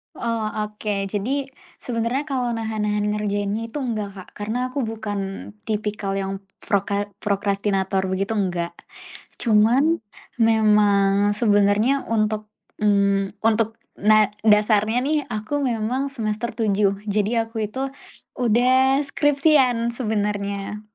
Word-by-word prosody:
Oh, 230 -1 -2 0.2
oke. 210 -2 -3
Jadi 255 +8 -1 0.3
sebenarnya 245 +4 -2
kalau 255 -4 -1
nahan-nahan 215 -2 -1
ngerjainnya 210 +2 -2
itu 295 - -4
enggak, 220 -6 -3
Kak. 190 -2 -11
Karena 225 +5 -2
aku 260 +1 -3
bukan 220 -2 -4 0.4
tipikal 210 -2 -2
yang 195 0 -4 0.2
proka 200 -1 -1 0.2
prokrastinator 195 -1 0
begitu, 195 +3 -1
enggak. 175 -4 -1 0.6
Cuman 240 +9 +3 0.4
memang 205 -2 +4
sebenarnya 210 +4 +2
untuk, 215 -1 0 0.3
mmm, 200 -2 +2
untuk 225 0 +2 0.2
na 215 0 +4 0.2
dasarnya 215 +2 +4
nih, 300 +2 +1
aku 215 +6 -3
memang 250 +1 -1
semester 225 -3 -3
7 205 -3 +1
jadi 215 +2 +1
aku 225 0 -5
itu 265 +5 -4 0.5
udah 255 +3 +4
skripsian 275 -5 +2
sebenarnya, 210 -3 -2
215 Hz, 110 wpm, -22 LUFS, 205-235 Hz, 0.6 s, memang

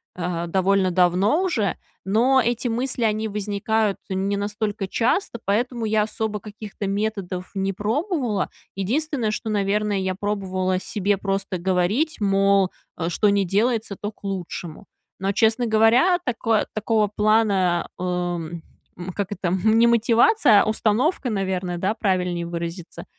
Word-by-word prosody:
э, 175 -1 -3
довольно 190 +1 +2
давно 185 - +3
уже. 225 - 0 0.3
Но 245 +7 +3
эти 240 +1 -1
мысли, 240 +1 -2
они 215 0 +1
возникают 210 0 -1
не 195 +1 -1
настолько 205 -1 -3
часто. 235 - 0
Поэтому 235 +3 0
я 215 0 +2
особо 215 -1 -3
каких-то 210 -1 -7
методов 195 -3 -3
не 195 0 0
пробовала. 235 - -1 0.3
Единственное, 240 +3 -1
что, 220 +1 -4
наверное, 205 0 0
я 190 -1 -2
пробовала 190 -2 -1
себе 200 0 -1
просто 195 -1 -2
говорить, 190 - 0
мол, 195 -1 +3 0.3
э, 165 - -2
что 210 +4 +2
ни 200 -1 +2
делается, 215 +2 0
то 205 +1 -3
к 205 - -35
лучшему. 185 -2 -5 0.3
Но, 195 +1 0
честно 225 +3 +2
говоря, 230 +11 +4
тако 230 -4 +1
такого 215 0 +1
плана, 205 -5 +2
эм, 175 -2 -3 0.4
м, 180 +1 -6
как 200 +1 -3
это, 185 -3 -2
м, 215 +5 +2
не 235 - +6
мотивация, 235 - +5
а - - -4
установка, 230 - +1
наверное, 190 -4 -2
да, 195 +5 0
правильнее 180 -5 -1
выразиться. 170 +1 -6
205 Hz, 140 wpm, -23 LUFS, 190-225 Hz, 0.4 s, не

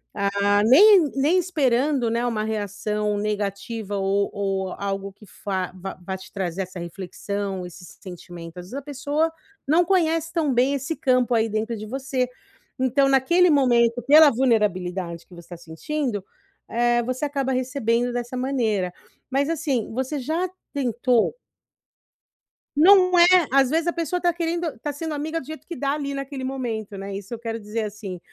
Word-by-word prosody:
ah, 200 0 +2
nem 350 - +7
nem 295 +7 +3
esperando, 275 -6 +1
né, 235 +1 0
uma 225 -3 -1
reação 210 0 -2
negativa 205 0 -3
ou 195 +1 +1
ou 195 -2 -2
algo 195 0 -4
que 210 - -17
fa 190 -1 -4
vá 190 +1 -7
vá 190 0 -3
te 190 - -14
trazer 190 -1 -2
essa 185 0 -9
reflexão, 190 +2 -5
esse 180 +1 -11 0.2
sentimento. 175 -2 -10
Às 180 - -9
vezes 195 - -13
a 280 - -3
pessoa 290 +3 -1 0.4
não 330 +5 +4
conhece 330 -3 +1
tão 315 -5 +1
bem 255 +3 +3
esse 275 +4 -3
campo 250 -3 +2
aí 225 0 +2
dentro 220 +2 -2
de 215 - -7
você. 260 +2 -2 0.5
Então, 260 +2 +3
naquele 340 +7 +4
momento, 245 -4 +3
pela 300 +3 +8
vulnerabilidade 185 -8 0
que - - -17
você 170 0 -13
tá 175 - -7
sentindo, 205 - -3 0.5
eh, 240 0 +2
você 255 +3 -4
acaba 275 -2 -1
recebendo 245 -2 0
dessa 240 +1 -4
maneira. 220 -9 0 0.4
Mas 275 +1 +1
assim, 285 -8 -1
você 260 +4 -2
já 325 +7 -1 0.2
tentou 245 - +1 1.4
Não 365 +3 +6
é. 345 - +9 0.3
Às 270 -1 +4
vezes 325 +4 0
a 345 - +1
pessoa 335 +1 -2
tá 350 -1 +2
querendo 335 -1 -2
tá 295 - -3
sendo 310 +2 -5
amiga 310 +3 -3
do 270 - -11
jeito 315 +2 -9
que 345 - -6
dá 275 -2 -1
ali 285 -1 -3
naquele 275 -1 -5
momento, 230 -6 -4
né, 195 0 -6
isso 200 +3 -7
eu 235 - -5
quero 230 -1 -4
dizer 215 +1 -4
assim. 205 -3 -6
240 Hz, 165 wpm, -23 LUFS, 200-285 Hz, 1.4 s, é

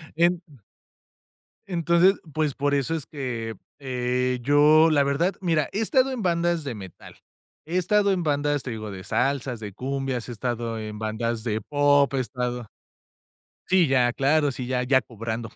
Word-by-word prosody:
En 175 +1 +2 1.3
entonces, 175 +1 +3 0.2
pues, 155 -3 0
por 145 0 0
eso 140 +3 0
es 155 -4 -4
que, 120 -6 -4 0.3
eh, 125 -1 -1
yo, 150 +4 +5
la 145 -2 +4
verdad, 140 +7 +1
mira, 165 -5 +1
he 210 - -1
estado 260 +3 +2
en 245 -4 -4
bandas 170 -1 +1
de 135 -4 -5
metal, 95 -3 -11 0.5
he 165 +4 -3
estado 200 +3 +3
en 185 -2 0
bandas, 145 -2 0
te 125 - -6
digo, 110 -3 -6
de 95 - -8
salsas, 135 +1 -1
de 105 -2 -7
cumbias, 130 +1 -3
he - - -5
estado. 120 -1 -3 2.9
Sí, 185 -2 +4
ya, 125 -2 +3
claro, 145 +3 +2
sí, 125 -1 -5
ya 125 0 0
ya 130 +1 +4
cobrando. 115 0 -5
140 Hz, 145 wpm, -25 LUFS, 125-170 Hz, 2.9 s, yo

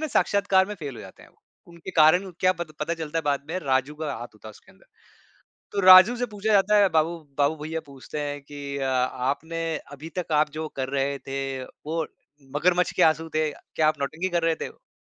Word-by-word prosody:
ना - - 0
साक्षात्कार 195 -2 +2
में 210 - -5
फेल 145 -7 -7
हो - - -9
जाते 95 - -13
हैं। - - -17 0.4
उनके 170 +2 -10
कारण 175 +5 +5
क्या 185 0 +4
पता 170 -3 -7
पता 165 +3 -1
चलता 165 -1 -4
है - - -2
बाद 145 -2 0
में 180 - -2
राजू 135 0 0
का 150 -1 -4
हाथ 120 +2 -6
होता 110 +1 -12
है - - -8
उसके 105 - -19
अंदर। - - -24 0.9
तो 200 - 0
राजू 185 +5 +9
से 245 - -1
पूछा 215 0 -2
जाता 205 +1 +4
है 200 -1 +5
बाबू, 165 +1 +1 0.2
बाबू 145 +2 +2
भैया 160 +1 -3
पूछते 140 +2 -8
हैं 145 0 -4
कि 140 0 -7
अ, 135 -1 -1
आपने 140 +6 -1 0.2
अभी 150 +3 -9
तक 175 -3 -3
आप 150 0 +3
जो 155 +1 -5
कर 130 -1 -2
रहे 140 0 -1
थे 135 -1 -4
वो 160 +3 -5 0.5
मगरमच्छ 180 +3 +2
के - - +1
आँसू 160 +1 +3
थे? 155 -1 +1
क्या 155 -1 -1
आप 155 - 0
नौटंकी 160 +6 -2
कर 175 -2 0
रहे 165 0 +2
थे? - - -5
क्यों - - -23
155 Hz, 220 wpm, -25 LUFS, 140-175 Hz, 0.9 s, राजू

